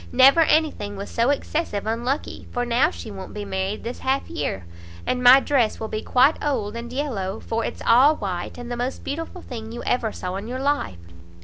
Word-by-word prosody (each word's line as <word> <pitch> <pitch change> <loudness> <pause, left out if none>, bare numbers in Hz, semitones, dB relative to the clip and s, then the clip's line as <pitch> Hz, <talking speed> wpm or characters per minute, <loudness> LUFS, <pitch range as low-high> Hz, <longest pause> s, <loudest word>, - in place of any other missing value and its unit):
Never 265 +5 +7
any 315 -1 +4
thing 205 0 -7
was 200 +1 -7
so 235 +2 +2
excessive 285 -6 -1
unlucky, 240 +6 -2
for 245 -1 -1
now 245 +6 +3
she 225 - -8
won't 190 0 -8
be 205 -1 -4
married 190 +1 -3
this 240 - -5
half 270 +1 0
year, 95 - -3 0.4
and 250 - 0
my 250 +2 +9
dress 265 -6 +1
will 220 - -4
be 215 - -3
quite 265 +5 +3
old 230 -8 -1
and 235 +1 -6
yellow; 225 -8 -3
for 225 0 -2
it's - - -5
all 265 +7 +6
white, 185 -7 -4
and 245 0 -7
the 240 - -3
most 245 +2 -3
beautiful 330 +5 -5
thing 225 -3 -7
you 240 - -6
ever 235 -3 0
saw 185 -1 -4
in 200 +3 -6
your 250 +2 -4
life." 275 - 0
240 Hz, 210 wpm, -23 LUFS, 210-275 Hz, 0.4 s, my